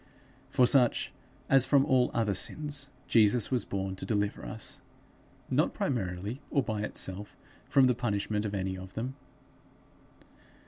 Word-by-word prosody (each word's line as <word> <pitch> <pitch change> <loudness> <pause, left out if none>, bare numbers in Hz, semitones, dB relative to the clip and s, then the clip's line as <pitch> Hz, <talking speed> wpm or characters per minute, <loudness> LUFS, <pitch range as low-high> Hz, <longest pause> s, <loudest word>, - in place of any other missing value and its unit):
From 125 - +4
such, 125 -1 +4 0.3
as 135 -1 +5
from 140 -1 +4
all 130 -4 +3
other 110 -3 0
sins, 145 +6 -1 0.2
Jesus 110 +1 +3
was 125 -2 +1
born 95 -1 -3
to - - -5
deliver 100 +1 -1
us; - - -5 0.7
not, - - +1
primarily, 100 +1 -3
or 140 - +1
by 110 -3 -3
itself, 100 -1 -2 0.3
from 135 -2 +5
the 125 - +4
punishment 105 -3 -2
of 105 -1 -3
any 95 -1 -2
of 95 0 -10
them. 125 +4 -3
110 Hz, 140 wpm, -29 LUFS, 100-130 Hz, 0.7 s, as